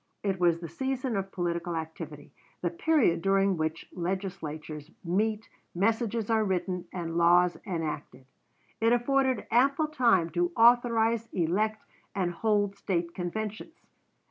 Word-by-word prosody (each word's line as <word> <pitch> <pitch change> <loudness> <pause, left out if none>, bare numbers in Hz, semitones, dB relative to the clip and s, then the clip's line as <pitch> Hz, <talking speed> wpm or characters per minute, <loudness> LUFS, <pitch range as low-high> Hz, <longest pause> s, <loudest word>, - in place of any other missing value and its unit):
It 195 -2 -1
was 170 -2 +3
the 170 - -6
season 260 - -2
of 195 0 -3
political 170 -1 -2
activity 160 -2 -7 0.3
the 175 - +1
period 245 - +2
during 195 0 +3
which 160 0 -3
legislatures 165 -5 -4
meet, 210 +5 0 0.3
messages 225 +3 0
are 225 -1 +2
written, 180 -2 -2
and 170 -2 -4
laws 175 +1 +5
enacted. 150 -7 -4 0.5
It 230 +1 +4
afforded 260 +2 +1
ample 275 +6 +3
time 235 - +3
to 350 0 0
authorize, 230 -1 +4
elect, 205 +6 0 0.3
and 185 -3 0
hold 205 +2 +1
State 170 -3 -2
conventions. 215 - -5
195 Hz, 125 wpm, -29 LUFS, 170-225 Hz, 0.5 s, laws